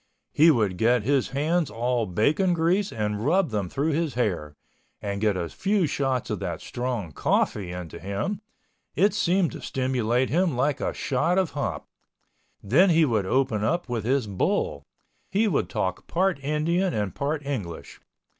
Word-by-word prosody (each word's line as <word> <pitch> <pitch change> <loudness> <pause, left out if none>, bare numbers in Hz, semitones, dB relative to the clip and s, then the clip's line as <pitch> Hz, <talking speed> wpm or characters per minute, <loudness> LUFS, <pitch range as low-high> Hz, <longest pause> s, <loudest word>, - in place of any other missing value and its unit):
He 160 +3 +6
would 105 - +2
get 120 0 +3
his 135 +2 +2
hands 155 +4 0
all 120 -1 -1
bacon 155 - +2
grease 180 +5 +1
and 105 -1 -2
rub 170 +2 +2
them 100 -4 -2
through 145 - 0
his 155 -2 -1
hair, 90 -11 -1 0.4
and 100 -1 -4
get 105 -3 +2
a 85 - -2
few 195 - 0
shots 130 -4 -1
of 105 - -2
that 85 -5 -4
strong 120 -8 -4
coffee 90 +5 0
into 90 -3 -7
him—it 195 - -3
seemed 185 -4 +2
to - - -8
stimulate 130 -2 0
him 170 -4 +1
like 140 +2 +1
a - - 0
shot 140 +8 0
of 190 -3 +1
hop. 145 - -3 0.8
Then 150 - +4
he 165 -1 +5
would 110 -8 0
open 115 -3 +1
up 170 +5 0
with 115 -3 -2
his 130 +1 +1
"bull." 90 -7 -1 0.4
He 215 +3 +2
would 140 - 0
talk 95 -1 -2
part 180 -4 0
Indian 165 +6 0
and 105 -3 -1
part 145 +1 -2
English. 105 -13 -5
130 Hz, 165 wpm, -25 LUFS, 105-165 Hz, 0.8 s, He